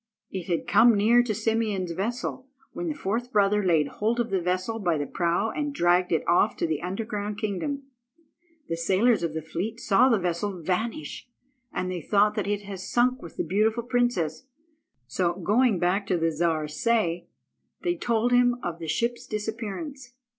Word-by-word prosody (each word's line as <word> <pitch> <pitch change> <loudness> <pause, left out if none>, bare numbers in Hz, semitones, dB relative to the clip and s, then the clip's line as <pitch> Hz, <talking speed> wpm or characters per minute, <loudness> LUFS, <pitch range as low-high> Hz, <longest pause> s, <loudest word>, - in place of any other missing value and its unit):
It 185 -3 -5
had 170 - 0
come 225 +2 +6
near 230 +4 +5
to 235 -3 -2
Simeon's 215 -4 0
vessel, 240 +7 -3 0.3
when 350 - -4
the 310 - -2
fourth 240 +1 -2
brother 205 0 +3
laid 160 -5 +3
hold 225 +8 -1
of 235 -3 -1
the 190 -2 +1
vessel 185 +6 -1
by 175 -6 +1
the 145 - -2
prow 175 +8 0
and 290 -1 -3
dragged 175 -1 +3
it 165 - 0
off 175 - +3
to - - 0
the 155 -2 -1
underground 205 +2 -3
kingdom. 220 +7 -3 0.8
The 165 - -2
sailors 195 +7 +3
of 165 -2 -2
the 160 - -3
fleet 200 +8 -4
saw 235 +4 +4
the 230 - +4
vessel 180 +1 -2
vanish, 180 +2 -3 0.4
and 185 - -2
they 180 -2 -4
thought 210 +4 +3
that 210 -2 -2
it 205 0 -1
had 195 -2 -7
sunk 245 +6 +1
with 170 - -11
the - - 0
beautiful 220 +4 +1
princess; 240 -7 0 0.6
so, 175 +8 0
going 210 +4 +2
back 185 +3 0
to 185 - +1
the 165 0 +1
Czar 160 -1 0
Say, 175 -1 0 0.6
they 350 -1 +1
told 240 -6 0
him 245 0 +4
of 170 -1 -4
the 165 - -6
ship's 235 +10 -1
disappearance. 230 - -5
205 Hz, 180 wpm, -26 LUFS, 175-235 Hz, 0.8 s, come